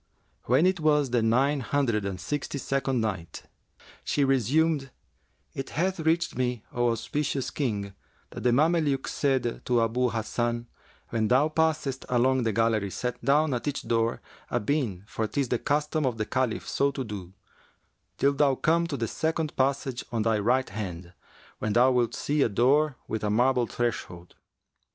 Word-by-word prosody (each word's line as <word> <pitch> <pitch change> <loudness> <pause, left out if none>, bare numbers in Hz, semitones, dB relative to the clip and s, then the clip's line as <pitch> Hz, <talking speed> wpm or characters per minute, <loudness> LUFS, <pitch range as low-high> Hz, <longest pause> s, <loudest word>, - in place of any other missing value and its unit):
When 130 +8 +4
it 185 -1 +2
was 150 -4 +2
the 120 -1 +2
Nine 130 +6 +2
Hundred 120 -5 0
and 95 -2 -4
Sixty 145 - -3
second 135 -2 -1
Night, 95 -7 -4 0.6
She 145 - +1
resumed, 135 +3 +2 0.6
It 135 - -5
hath 185 +4 -1
reached 165 +2 +1
me, 125 -2 -1
O 120 0 +2
auspicious 135 +3 -2
King, 105 -8 -2 0.4
that - - -7
the 125 - +3
Mameluke 150 0 +2
said 130 -4 0
to 120 -1 +2
Abu 125 +3 +1
Hasan, 120 +1 -2 0.4
"When 110 -2 0
thou 135 +6 +3
passest 155 -4 0
along 130 +1 +3
the 110 - +2
gallery 110 -1 +1
set 125 +5 -4
down 145 +3 +3
at 125 +3 -3
each 145 - -2
door 115 0 0 0.3
a 120 - 0
bean 110 -6 -1
for 110 +1 -3
'tis 130 +4 -1
the 125 - 0
custom 150 0 0
of 120 -3 -2
the 110 - -1
Caliph 130 -2 -1
so 140 - +1
to 140 -1 -4
do, 100 -5 -7 0.8
till 140 +1 +3
thou 140 -1 +3
come 170 +5 +2
to 145 -4 -3
the 115 - -1
second 160 +2 -2
passage 135 -1 0
on 115 -2 0
thy 110 -1 +2
right 125 +4 +1
hand, 90 -4 -6 0.5
when 105 - -1
thou 125 +3 +5
wilt 120 -2 +1
see 150 0 0
a 120 - +3
door 135 +6 +2
with 110 -1 -3
a 105 - +1
marble 125 +2 +2
threshold 90 -8 -4
125 Hz, 170 wpm, -27 LUFS, 115-145 Hz, 0.8 s, thou